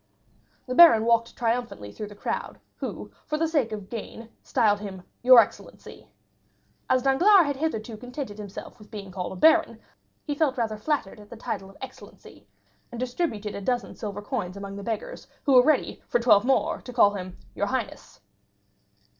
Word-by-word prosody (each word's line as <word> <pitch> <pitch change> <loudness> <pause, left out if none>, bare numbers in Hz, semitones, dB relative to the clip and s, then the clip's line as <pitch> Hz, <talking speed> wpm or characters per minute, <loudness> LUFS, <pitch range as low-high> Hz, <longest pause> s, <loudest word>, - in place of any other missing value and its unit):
The 255 - -4
baron 255 -8 +8
walked 230 0 +2
triumphantly 235 - -2
through 210 - -7
the 205 - -12
crowd, - - -4 0.2
who - - -6 0.2
for 305 - -1
the 325 +1 +1
sake 290 -8 0
of 205 -3 -6
gain 230 0 -8
styled 205 -2 +2
him 195 -3 -8 0.2
"your 255 0 +9
excellency." 225 - -3 0.8
As 255 -1 +3
Danglars 350 +8 +5
had 285 -1 -1
hitherto 240 -7 -3
contented 245 -2 -7
himself 205 -2 -9
with 210 - -16
being 200 -3 -8
called 180 -1 -5
a - - -8
baron, 320 - +4 0.4
he 295 - -3
felt 285 -2 0
rather 225 -3 -1
flattered 280 -6 -2
at 210 0 -15
the 235 - -10
title 195 -3 -5
of 195 - -17
excellency, 265 - -12 0.4
and 240 - -7
distributed 245 -5 -3
a 200 - -6
dozen 245 +3 -2
silver 205 -2 -6
coins 180 -2 -4
among 200 0 -7
the 200 - -7
beggars, 230 - -5 0.2
who 280 - +2
were 250 - +9
ready, 305 0 +1
for - - +2
twelve 235 -3 +5
more, 265 +1 +1
to 250 - -9
call 220 -4 +4
him 185 -2 -7 0.2
"your 205 - -1
highness." 260 +3 -5
230 Hz, 180 wpm, -26 LUFS, 205-265 Hz, 0.8 s, your